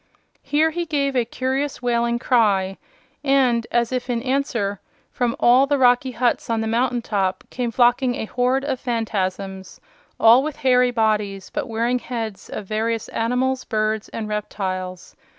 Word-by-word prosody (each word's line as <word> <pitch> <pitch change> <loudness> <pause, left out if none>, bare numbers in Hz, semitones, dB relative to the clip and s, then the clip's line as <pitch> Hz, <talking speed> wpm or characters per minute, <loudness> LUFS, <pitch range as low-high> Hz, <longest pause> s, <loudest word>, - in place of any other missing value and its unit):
Here 300 +3 +2
he 340 +1 -3
gave 280 -3 0
a 245 -2 +2
curious 265 +4 -2
wailing 235 -1 0
cry, 205 -6 +2 0.4
and, 260 -5 +2
as 235 0 +1
if 255 0 -3
in 235 -1 -1
answer, 250 -7 -1 0.3
from 240 -2 -1
all 255 +3 +5
the 285 0 +2
rocky 250 0 +4
huts 245 -1 0
on 230 -1 +1
the 220 - -1
mountain 240 +2 0
top 195 -4 -1
came 245 -1 -2
flocking 245 +2 +3
a - - -3
horde 255 +4 0
of 270 -3 -2
Phanfasms, 195 -5 -3 0.4
all 230 +3 +7
with 300 +1 -4
hairy 250 -3 +3
bodies, 210 -4 -1
but - - -3
wearing 235 +2 0
heads 225 -6 -5
of 210 - -6
various 220 +2 -2
animals, 255 +3 0
birds 215 -1 -1
and 220 -2 -5
reptiles. 185 -3 -4
240 Hz, 155 wpm, -22 LUFS, 215-255 Hz, 0.4 s, all